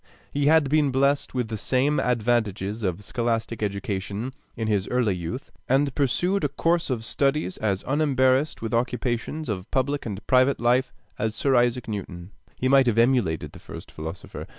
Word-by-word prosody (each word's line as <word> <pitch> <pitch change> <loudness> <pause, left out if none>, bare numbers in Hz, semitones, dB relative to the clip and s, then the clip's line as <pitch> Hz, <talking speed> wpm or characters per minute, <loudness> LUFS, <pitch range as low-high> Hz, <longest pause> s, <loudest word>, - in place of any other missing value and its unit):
Had 150 +2 +4
he - - -3
been 145 -2 +2
blessed 140 +1 +1
with 125 -3 -1
the 110 -2 -4
same 135 +6 +1
advantages 110 -3 0
of 95 0 -2
scholastic 115 0 -2
education 100 +3 -3 0.2
in 115 -1 -3
his 100 -2 +1
early 120 -5 +1
youth, 90 +9 -5 0.2
and 135 +1 +2
pursued 175 +8 +1
a 145 - +2
course 165 +4 0
of 115 -4 -2
studies 140 -8 0
as 100 -3 -1
unembarrassed 135 -1 +2
with 115 - -3
occupations 125 +5 -1
of 95 -5 -4
public 140 0 -1
and 105 0 -6
private 130 +2 +3
life 125 +2 +2 0.3
as 110 +1 -1
Sir 135 +3 +2
Isaac 120 0 +2
Newton, 95 -4 -6 0.2
he 130 - -1
might 135 -1 +5
have 115 -2 +2
emulated 115 - +2
the - - -13
first - - -10
philosopher. 80 +3 -7
120 Hz, 170 wpm, -25 LUFS, 105-135 Hz, 0.3 s, might